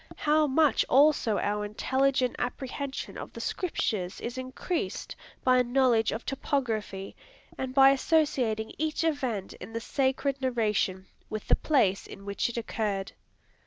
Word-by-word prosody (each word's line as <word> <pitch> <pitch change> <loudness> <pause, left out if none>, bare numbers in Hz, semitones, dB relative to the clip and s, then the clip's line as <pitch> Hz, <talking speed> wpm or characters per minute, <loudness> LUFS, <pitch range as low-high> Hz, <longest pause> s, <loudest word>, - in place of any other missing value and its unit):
How 305 0 +3
much 295 +1 +3
also 275 -6 +4
our 210 0 -1
intelligent 260 +4 +1
apprehension 265 +2 -4
of - - -8
the - - -8
scriptures 215 - -2
is 240 +1 -5
increased, 260 +7 -4 0.3
by 255 -1 +5
a - - +4
knowledge 245 -3 +3
of 225 - -5
topography, 225 -8 -2 0.4
and 260 -1 -4
by 270 0 +8
associating 265 -7 +1
each 315 +1 0
event 260 - -1
in 225 - -8
the 230 - -2
sacred 270 +2 0
narration 210 -7 0 0.2
with 215 -1 -5
the - - +6
place 210 -11 +1
in 200 - -11
which 200 +3 -1
it 240 - -6
occurred? 210 -4 -2
255 Hz, 140 wpm, -28 LUFS, 215-275 Hz, 0.4 s, by